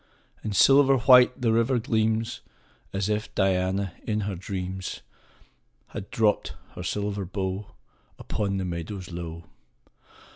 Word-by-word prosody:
5 -, -, -31 dB
And 105 Hz, -2 st, -2 dB
silver 135 Hz, +4 st, +6 dB
white 125 Hz, 0 st, +6 dB
the 120 Hz, -3 st, +2 dB
river 115 Hz, +3 st, +2 dB
gleams, 110 Hz, 0 st, 0 dB, 0.5 s
As 100 Hz, 0 st, -1 dB
if 105 Hz, 0 st, -2 dB
Diana, 95 Hz, -1 st, +1 dB
in 105 Hz, -1 st, -1 dB
her 100 Hz, 0 st, -2 dB
dreams, 95 Hz, 0 st, -5 dB, 0.9 s
• -, -, -26 dB
Had 100 Hz, -, -6 dB
dropt 110 Hz, -2 st, +1 dB, 0.2 s
her -, -, -7 dB
silver 100 Hz, +2 st, -2 dB
bow 95 Hz, +1 st, -3 dB, 0.5 s
Upon 100 Hz, -2 st, -2 dB
the 95 Hz, -, -2 dB
meadows 90 Hz, +2 st, -5 dB
low. 85 Hz, -1 st, -6 dB
100 Hz, 135 wpm, -26 LUFS, 95-110 Hz, 0.9 s, silver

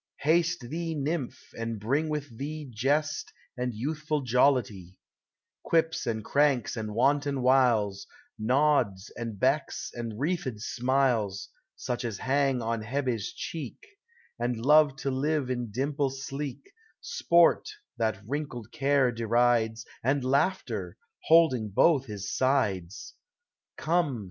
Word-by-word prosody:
Haste 170 Hz, +2 st, +2 dB
thee, 165 Hz, +1 st, -3 dB
nymph, 145 Hz, -2 st, -3 dB
and 115 Hz, -1 st, -4 dB
bring 140 Hz, +9 st, 0 dB
with 145 Hz, -5 st, -4 dB
thee 150 Hz, +4 st, -5 dB
Jest, 145 Hz, +7 st, 0 dB, 0.2 s
and 125 Hz, 0 st, -2 dB
youthful 150 Hz, +6 st, -2 dB
Jollity, 120 Hz, -8 st, +1 dB, 0.3 s
— -, -, -64 dB
Quips 160 Hz, -4 st, +1 dB
and 110 Hz, -2 st, -2 dB
cranks 140 Hz, -4 st, +2 dB
and 110 Hz, -2 st, -5 dB
wanton 140 Hz, +1 st, +1 dB
wiles, 120 Hz, -7 st, +3 dB, 0.3 s
Nods 125 Hz, -4 st, +1 dB
and 115 Hz, -4 st, -5 dB
becks 135 Hz, +5 st, 0 dB
and 115 Hz, -2 st, -6 dB
wreathed 145 Hz, -7 st, -2 dB
smiles, 120 Hz, -5 st, 0 dB, 0.3 s
Such 125 Hz, 0 st, -4 dB
as 115 Hz, -4 st, -3 dB
hang 135 Hz, -1 st, +1 dB
on 115 Hz, 0 st, -1 dB
Hebe's 120 Hz, -2 st, -2 dB
cheek, 160 Hz, -4 st, -6 dB, 0.6 s
And 120 Hz, -1 st, -2 dB
love 150 Hz, -1 st, +6 dB
to 135 Hz, -, -1 dB
live 140 Hz, 0 st, 0 dB
in 120 Hz, -2 st, -3 dB
dimple 140 Hz, +5 st, -1 dB
sleek, 135 Hz, -, -6 dB, 0.2 s
— -, -, -38 dB
Sport, 170 Hz, -, +3 dB, 0.3 s
that 110 Hz, -3 st, 0 dB
wrinkled 125 Hz, -3 st, -5 dB
Care 135 Hz, -2 st, +2 dB
derides, 115 Hz, -1 st, +1 dB, 0.2 s
And 135 Hz, +2 st, +1 dB
Laughter, 140 Hz, +9 st, 0 dB, 0.3 s
holding 155 Hz, -10 st, +4 dB
both 135 Hz, -, +3 dB
his 100 Hz, -2 st, -5 dB
sides. 105 Hz, -9 st, 0 dB, 0.6 s
Come 155 Hz, -6 st, 0 dB
130 Hz, 125 wpm, -28 LUFS, 115-145 Hz, 0.6 s, love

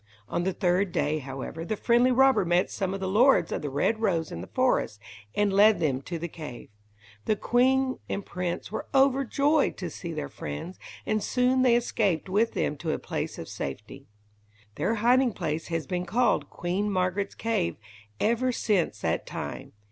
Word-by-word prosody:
On 175 Hz, -, -2 dB
the 190 Hz, -, +1 dB
third 180 Hz, +1 st, +1 dB
day, 155 Hz, -1 st, 0 dB
however, 135 Hz, +4 st, -6 dB
the 215 Hz, +5 st, -3 dB
friendly 240 Hz, +3 st, +3 dB
robber 265 Hz, -3 st, +5 dB
met 175 Hz, +1 st, +1 dB
some 190 Hz, -2 st, -2 dB
of -, -, -5 dB
the 190 Hz, -, -2 dB
lords 240 Hz, +8 st, +4 dB
of -, -, -2 dB
the 145 Hz, -, -3 dB
Red 145 Hz, +11 st, 0 dB
Rose 170 Hz, -8 st, 0 dB
in 85 Hz, -, -5 dB
the 95 Hz, -, -8 dB
forest, 250 Hz, -, +1 dB, 0.4 s
and 205 Hz, -1 st, +2 dB
led 210 Hz, +2 st, +6 dB
them 135 Hz, -4 st, 0 dB
to 170 Hz, +5 st, -5 dB
the 170 Hz, +1 st, -4 dB
cave. 150 Hz, -8 st, -9 dB, 0.6 s
The 215 Hz, -, +2 dB
queen 260 Hz, +4 st, +2 dB
and 200 Hz, -, -3 dB
prince 175 Hz, -1 st, -4 dB
were -, -, -4 dB
overjoyed 275 Hz, +2 st, +3 dB
to 175 Hz, -3 st, -5 dB
see 170 Hz, -, -6 dB
their 155 Hz, -2 st, -4 dB
friends, 75 Hz, -, -7 dB, 0.3 s
and 215 Hz, 0 st, 0 dB
soon 250 Hz, +3 st, +2 dB
they 250 Hz, -2 st, +5 dB
escaped 205 Hz, -8 st, 0 dB
with 215 Hz, +4 st, +2 dB
them 150 Hz, -, -1 dB
to 160 Hz, 0 st, -2 dB
a -, -, -1 dB
place -, -, -4 dB
of -, -, -7 dB
safety. 105 Hz, -, -7 dB, 0.7 s
Their 225 Hz, -, 0 dB
hiding 245 Hz, +2 st, +3 dB
place 155 Hz, -1 st, -3 dB
has 165 Hz, -2 st, -2 dB
been 180 Hz, -1 st, -3 dB
called 240 Hz, +7 st, +1 dB
"Queen 185 Hz, +4 st, -2 dB
Margaret's 185 Hz, +1 st, -1 dB
Cave" 225 Hz, -, -1 dB, 0.4 s
ever 235 Hz, +3 st, +2 dB
since 210 Hz, -7 st, 0 dB
that -, -, -1 dB
time. -, -, -6 dB
195 Hz, 180 wpm, -27 LUFS, 165-235 Hz, 0.7 s, led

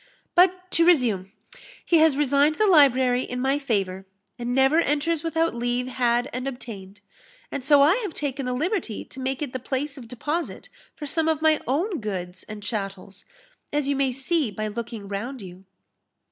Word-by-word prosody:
But 365 Hz, +1 st, +3 dB
to 335 Hz, -, +4 dB
resume 235 Hz, -, +3 dB, 0.5 s
he 340 Hz, -, +4 dB
has 315 Hz, -3 st, +4 dB
resigned 285 Hz, +1 st, +3 dB
the 430 Hz, -, +2 dB
library 260 Hz, -, +5 dB
in 250 Hz, -1 st, -5 dB
my 270 Hz, +3 st, +1 dB
favour, 195 Hz, -8 st, -2 dB, 0.3 s
and 240 Hz, 0 st, -3 dB
never 270 Hz, +4 st, +4 dB
enters 305 Hz, +1 st, 0 dB
without 330 Hz, 0 st, 0 dB
leave 245 Hz, +1 st, -1 dB
had 245 Hz, -1 st, +1 dB
and 255 Hz, +2 st, -3 dB
obtained; 205 Hz, -6 st, -8 dB, 0.5 s
and 280 Hz, -, -4 dB
so 285 Hz, 0 st, +6 dB
I 325 Hz, +9 st, +5 dB
have 415 Hz, -9 st, -4 dB
taken 275 Hz, -2 st, -2 dB
the 250 Hz, -, -1 dB
liberty 310 Hz, -, -2 dB
to 265 Hz, -, -12 dB
make 265 Hz, +2 st, -2 dB
it 275 Hz, -, -6 dB
the 255 Hz, -, -3 dB
place 275 Hz, +3 st, -3 dB
of 235 Hz, -, -11 dB
deposit 295 Hz, +8 st, -4 dB, 0.3 s
for 300 Hz, -, -7 dB
some 320 Hz, +2 st, +1 dB
of 315 Hz, -1 st, 0 dB
my 315 Hz, -1 st, +4 dB
own 335 Hz, -, 0 dB
goods 185 Hz, -4 st, -5 dB
and 210 Hz, -1 st, -7 dB
chattels, 195 Hz, -3 st, -5 dB, 0.5 s
as 290 Hz, -1 st, 0 dB
you 280 Hz, -, +1 dB
may 270 Hz, -1 st, +1 dB
see 270 Hz, +2 st, 0 dB
by 215 Hz, +1 st, -4 dB
looking 225 Hz, -1 st, -6 dB
round 230 Hz, +7 st, -5 dB
you." 185 Hz, +1 st, -12 dB
265 Hz, 180 wpm, -24 LUFS, 235-305 Hz, 0.5 s, so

